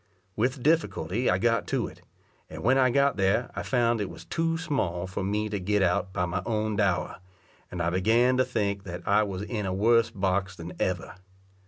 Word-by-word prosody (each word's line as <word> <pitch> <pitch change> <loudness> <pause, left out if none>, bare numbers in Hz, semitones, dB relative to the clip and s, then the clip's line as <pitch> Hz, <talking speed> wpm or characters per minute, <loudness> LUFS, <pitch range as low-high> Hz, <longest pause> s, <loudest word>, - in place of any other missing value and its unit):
With 125 +3 -1
difficulty 120 - +1
I 90 - +3
got 115 +3 +1
to - - 0
it, - - -11 0.5
and - - -8
when 125 +5 +4
I 130 -1 +4
got 140 +2 +2
there, 100 +5 +1
I - - -2
found 120 -3 +1
it 100 - -3
was - - -11
too 165 0 -1
small 95 - -2
for 95 +1 -4
me 105 +2 -1
to 100 -1 -2
get 100 +2 +1
out 95 +1 +1
by 90 -2 -1
my 90 +2 -2
own 110 0 -1
dower, 95 -4 0 0.5
and 90 -1 -3
I 85 - +1
began 115 +7 +3
to 130 - +4
think 100 -6 -2
that 90 -1 -7
I 105 +2 +4
was 100 -2 -3
in 105 -2 -3
a 95 - -1
worse 115 +3 +4
box 95 -3 -1
than 85 +1 -8
ever. 90 -1 -2
105 Hz, 205 wpm, -27 LUFS, 95-120 Hz, 0.5 s, when